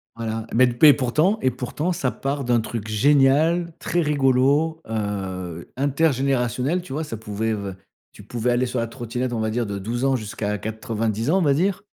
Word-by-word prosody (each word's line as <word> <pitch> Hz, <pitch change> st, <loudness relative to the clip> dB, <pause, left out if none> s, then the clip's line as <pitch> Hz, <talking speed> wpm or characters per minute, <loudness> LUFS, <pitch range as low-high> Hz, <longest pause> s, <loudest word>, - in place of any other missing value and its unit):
Voilà, 115 Hz, -1 st, -4 dB
mais 130 Hz, +2 st, +6 dB
d 125 Hz, -, 0 dB
p 150 Hz, +6 st, +6 dB
et 145 Hz, -, +9 dB
pourtant 150 Hz, -, +1 dB
et 130 Hz, -, +2 dB
pourtant 130 Hz, +7 st, -3 dB
ça 140 Hz, -7 st, -1 dB
part 140 Hz, +1 st, -3 dB
d'un 120 Hz, -2 st, +2 dB
truc 110 Hz, -1 st, -5 dB
génial, 145 Hz, +8 st, +3 dB
très 175 Hz, -, 0 dB
rigolo, 145 Hz, +2 st, +2 dB
heu, 95 Hz, -5 st, -4 dB
intergénérationnel, 135 Hz, +1 st, +1 dB
tu 175 Hz, -, -12 dB
vois? 155 Hz, +3 st, -2 dB
Ca 115 Hz, -7 st, -6 dB
pouvait 110 Hz, +1 st, -2 dB
v 100 Hz, -2 st, -4 dB, 0.4 s
tu -, -, -13 dB
pouvais 120 Hz, 0 st, -2 dB
aller 120 Hz, +1 st, +2 dB
sur 125 Hz, 0 st, -2 dB
la 115 Hz, -, -1 dB
trottinette, 120 Hz, +1 st, -4 dB
on 120 Hz, -, -2 dB
va 110 Hz, 0 st, -1 dB
dire 120 Hz, 0 st, -1 dB
de 100 Hz, 0 st, -4 dB
12 120 Hz, +7 st, -1 dB
ans -, -, +2 dB
jusqu'à 105 Hz, -2 st, -3 dB
90 110 Hz, +2 st, -3 dB
ans, 185 Hz, -, +4 dB
on -, -, +2 dB
va 145 Hz, -3 st, +4 dB
dire, 185 Hz, +7 st, 0 dB
125 Hz, 200 wpm, -23 LUFS, 110-145 Hz, 0.4 s, et